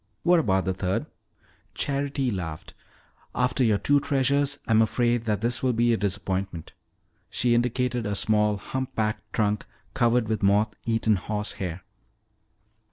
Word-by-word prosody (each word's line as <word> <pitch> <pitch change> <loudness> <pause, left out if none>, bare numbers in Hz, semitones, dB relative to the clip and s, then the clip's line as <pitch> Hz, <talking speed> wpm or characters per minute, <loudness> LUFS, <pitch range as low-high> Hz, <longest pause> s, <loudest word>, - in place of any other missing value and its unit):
"What 175 0 +5
about 95 -10 +1
the 95 - 0
third?" 95 +1 -1 0.7
Charity 140 -2 -1
laughed. 85 -6 -5 0.6
"After 125 +1 +1
your 110 -4 +3
two 145 +8 +3
treasures 140 +1 +1
I'm 110 0 +4
afraid 120 +1 +1
that 105 -3 0
this 120 +1 0
will 130 -1 +2
be 120 +1 +3
a - - +1
disappointment." 95 -4 -3 0.6
She 120 0 +1
indicated 120 -1 0
a 105 - -1
small 105 +1 +2
humpbacked 110 -2 -3
trunk 105 -1 0 0.3
covered 120 -2 +2
with 110 0 -1
moth 100 +2 +3
eaten 115 -2 +2
horsehair. 95 -3 -4
110 Hz, 135 wpm, -26 LUFS, 100-125 Hz, 0.7 s, What